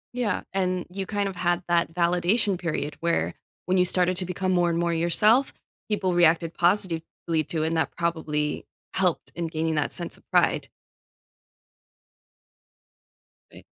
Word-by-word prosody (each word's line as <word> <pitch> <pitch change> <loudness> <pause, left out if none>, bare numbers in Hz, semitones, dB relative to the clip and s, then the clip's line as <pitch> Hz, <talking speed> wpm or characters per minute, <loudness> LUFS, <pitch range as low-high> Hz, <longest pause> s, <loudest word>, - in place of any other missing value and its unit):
Yeah, 240 -6 -1
and 185 -2 0
you 190 +1 -4
kind 205 0 -1
of 190 - -8
had 175 0 0
that 170 -2 +1
validation 180 +4 +2
period 155 -4 -3
where 170 0 0 0.3
when 185 +1 +1
you 180 - +4
started 180 0 +2
to 185 - +1
become 185 +1 -2
more 175 -1 +3
and 170 - 0
more 170 0 0
yourself, 210 +10 +3 0.4
people 190 -4 0
reacted 170 -1 +3
positively 170 -3 0
to, 160 +1 -2
and 160 +1 0
that 160 - -1
probably 155 -3 -2 0.3
helped 180 -3 0
in 170 -1 -2
gaining 160 0 -1
that 150 - 0
sense 175 - -2
of - - -26
pride. - - +2 2.9
Like - - -14
175 Hz, 150 wpm, -25 LUFS, 165-185 Hz, 2.9 s, you